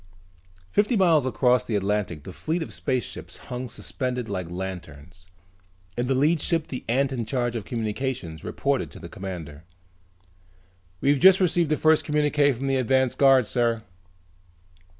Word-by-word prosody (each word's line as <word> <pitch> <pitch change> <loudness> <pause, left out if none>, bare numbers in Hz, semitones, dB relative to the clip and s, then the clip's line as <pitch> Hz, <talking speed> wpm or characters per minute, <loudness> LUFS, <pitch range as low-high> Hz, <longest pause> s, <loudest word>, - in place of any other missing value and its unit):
Fifty 210 +4 +2
miles 165 -8 +4
above 125 -1 +2
the 110 - -1
Atlantic 100 -6 -1
the 95 - -9
fleet 160 - -2
of - - -9
spaceships 130 -4 -3
hung 125 0 -6
suspended 125 0 -4
like 90 -5 -4
lanterns. 90 -2 -8 0.7
In 120 +1 -1
the 135 - +1
lead 150 +4 +2
ship 165 -2 0
the 130 - -5
ant 135 +3 +2
in 125 -3 -2
charge 120 0 -1
of 110 -4 -4
communications 115 - -3
reported - - -1
to - - -12
the - - -9
commander. 85 -6 -7 1.4
"We've 140 0 +3
just 190 +3 +7
received 175 -3 +2
the 155 - +2
first 155 0 +4
communique 150 -1 +2
from 130 +3 -5
the 135 -1 +1
advance 130 0 +2
guard, 135 -3 +5
sir." 115 -1 0
125 Hz, 150 wpm, -25 LUFS, 105-145 Hz, 1.4 s, just